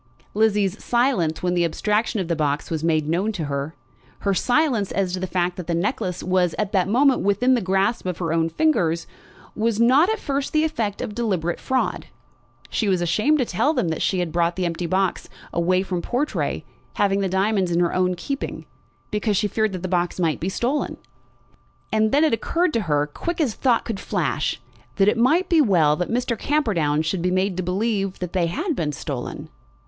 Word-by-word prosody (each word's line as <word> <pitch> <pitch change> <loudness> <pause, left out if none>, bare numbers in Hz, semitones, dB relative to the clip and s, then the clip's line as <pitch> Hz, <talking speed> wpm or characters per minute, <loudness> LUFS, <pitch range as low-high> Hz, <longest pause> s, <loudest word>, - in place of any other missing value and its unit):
Lizzie's 210 -2 +1
silence 235 - +1
when 180 0 +1
the 175 -1 +2
abstraction 210 +6 0
of 185 - -2
the 170 - 0
box 150 -1 -1
was 160 -1 -2
made 155 -2 +1
known 180 +7 0
to 175 -6 -3
her, 140 +2 -3 0.5
her 200 - +1
silence 245 - +1
as 190 -2 -1
to 185 - -2
the 185 - -3
fact 180 -1 -1
that 180 - -6
the 170 - 0
necklace 190 0 -2
was 180 -2 +1
at 210 -2 -1
that 190 -3 +2
moment 260 +5 +3
within 205 +6 +2
the 245 - +2
grasp 190 +3 0
of 180 -2 -2
her 165 -3 -2
own 165 0 +1
fingers, 170 - +1 0.5
was 225 0 0
not 265 - +5
at 440 - +1
first 280 -7 -3
the 310 0 +3
effect 230 -11 -2
of 230 -4 -5
deliberate 190 -7 -1
fraud. 260 -1 -1 0.6
She 220 - 0
was 185 -2 +2
ashamed 210 - +2
to 255 - +1
tell 285 - +1
them 170 - 0
that 160 - -3
she 180 -2 +1
brought 170 +1 0
the 185 - -2 0.2
box 190 0 0 0.2
empty 185 +2 +2
from 180 -2 -3
Portray, 265 +9 -2 0.3
having 200 -1 +2
the 195 -1 0
diamonds 190 0 +1
in 170 0 +1
her 175 -1 +1
own 185 0 +1
keeping 275 +10 -5 0.5
because 210 -1 0
she - - +1
had 205 - -4
feared 220 -1 +1
that 185 -1 -5
the - - -1
box 175 0 -1
might 165 -3 +1
be 180 - -2
stolen. 250 +9 -1 1.0
And 220 0 +2
then 290 +3 +4
it 310 - +3
occurred 335 +8 0
to 230 - +1
her, 145 0 +2
quick 335 - -5
as 275 -9 +1
thought 245 -1 +1
could 220 -5 -4
flash, 155 - -1 0.4
that 195 - +3
it 210 - +4
might 300 +11 +3
be 330 -3 +4
well 170 - +4
that 180 - -2
Mr. 240 0 0
Camperdown 180 - +1
should 170 +3 -1
be 180 - +1
made 185 +1 0
to - - 0
believe 195 +1 -1
that 180 -2 -5
they 180 -3 +1
had 315 - -2
been 150 -8 -2
stolen. 140 -4 -5
195 Hz, 205 wpm, -23 LUFS, 175-235 Hz, 1.0 s, not